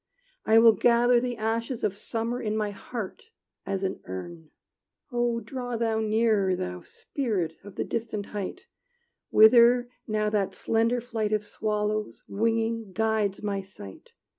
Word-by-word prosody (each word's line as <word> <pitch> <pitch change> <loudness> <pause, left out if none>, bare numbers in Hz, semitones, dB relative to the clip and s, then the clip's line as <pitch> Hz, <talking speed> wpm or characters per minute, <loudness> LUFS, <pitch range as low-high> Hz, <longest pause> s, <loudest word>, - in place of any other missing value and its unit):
I 220 - +6
will 225 0 +8
gather 240 +3 +4
the 245 -1 -3
ashes 230 +2 -2
of 205 -2 0
summer 230 +4 -3
In 215 -1 -1
my 210 -1 -1
heart, 210 - -7 0.4
as 195 0 -2
an 190 - -2
urn. 155 - -8 0.6
Oh 240 -1 0
draw 245 -2 -4
thou 225 -1 0
nearer, 215 -3 +2
Thou 90 - -5
Spirit 205 - -3
of 205 0 -11
the - - -1
distant 220 -3 -3
height, 200 -3 -5 0.6
Whither 240 +2 +6 0.2
now 215 -1 0
that 195 -2 0
slender 230 +2 +1
flight 225 -3 -2
Of 210 -1 0
swallows, 210 0 -2
winging, 225 -1 -1
guides 215 -1 0
my 200 -1 -1
sight! 185 - -13
220 Hz, 140 wpm, -27 LUFS, 205-230 Hz, 0.6 s, will